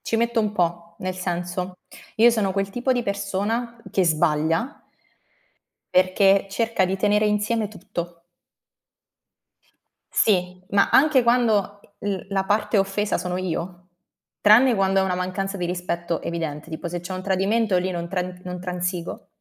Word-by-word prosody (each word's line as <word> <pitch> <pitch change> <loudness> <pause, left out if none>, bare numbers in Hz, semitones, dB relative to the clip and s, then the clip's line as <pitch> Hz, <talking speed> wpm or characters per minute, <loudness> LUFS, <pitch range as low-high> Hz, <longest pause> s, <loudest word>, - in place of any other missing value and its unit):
ci - - -4
metto 235 +1 +1
un 210 -1 -1
po', 170 -2 -1
nel 185 0 -3
senso, 180 0 -3 0.4
io 235 +2 +7
sono 205 -5 0
quel 195 0 -1
tipo 245 +5 0
di 245 -1 0
persona 205 +4 -2
che 190 - +2
sbaglia 160 - +1 1.1
perché 195 +2 +4
cerca 225 -2 +1
di 190 +1 -1
tenere 210 +1 +2
insieme 210 +1 0
tutto. 175 -4 -7 1.9
Sì, 185 -3 +1
ma 200 0 +3
anche 280 -3 +5
quando 220 -4 +2 0.2
l 200 -1 -1
la 195 -1 0
parte 210 +1 +1
offesa 195 +2 0
sono 180 0 -3
io, 180 0 -4 0.5
tranne 230 +4 +6
quando 195 -1 +2
è - - +2
una 185 -1 0
mancanza 185 +2 -3
di 175 -2 -2
rispetto 175 -1 -3
evidente, 160 -2 -4
tipo 160 +2 -5
se 175 +1 -4
c'è 180 +2 -7
un 185 - -5
tradimento 200 +2 +1
lì 185 +1 -1
non 170 -1 -4
tran 180 0 -4
non 180 0 -5
transigo. 180 -1 -4
190 Hz, 150 wpm, -23 LUFS, 180-210 Hz, 1.9 s, io